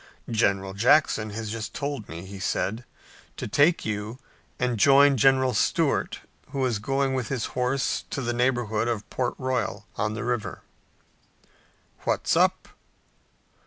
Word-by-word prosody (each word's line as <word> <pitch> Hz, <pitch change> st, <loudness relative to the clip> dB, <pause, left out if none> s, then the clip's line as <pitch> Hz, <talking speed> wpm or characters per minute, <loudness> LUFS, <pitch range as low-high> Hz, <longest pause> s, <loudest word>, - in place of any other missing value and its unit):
"General 100 Hz, -4 st, +1 dB
Jackson 110 Hz, 0 st, +3 dB
has 105 Hz, 0 st, -5 dB
just 110 Hz, -2 st, -5 dB
told 140 Hz, -6 st, -4 dB
me," 85 Hz, +3 st, -7 dB
he 100 Hz, 0 st, -9 dB
said, 110 Hz, +5 st, -2 dB, 0.5 s
"to -, -, -4 dB
take 155 Hz, +4 st, +3 dB
you 105 Hz, +2 st, -3 dB, 0.4 s
and 125 Hz, -3 st, -1 dB
join 140 Hz, +4 st, +6 dB
General 130 Hz, +1 st, +4 dB
Stuart, 105 Hz, -, +1 dB, 0.3 s
who 135 Hz, -2 st, -1 dB
is 120 Hz, -5 st, 0 dB
going 135 Hz, +4 st, 0 dB
with 130 Hz, -3 st, -2 dB
his 130 Hz, -5 st, -2 dB
horse 125 Hz, +2 st, 0 dB
to -, -, -3 dB
the 120 Hz, 0 st, -1 dB
neighborhood 120 Hz, -3 st, 0 dB
of 115 Hz, -3 st, -2 dB
Port 125 Hz, -2 st, -1 dB
Royal 130 Hz, -6 st, -2 dB
on 105 Hz, +1 st, -1 dB
the 115 Hz, -, -4 dB
river." 120 Hz, -3 st, -3 dB, 1.4 s
"What's -, -, +1 dB
up?" -, -, +2 dB
120 Hz, 140 wpm, -26 LUFS, 105-130 Hz, 1.4 s, join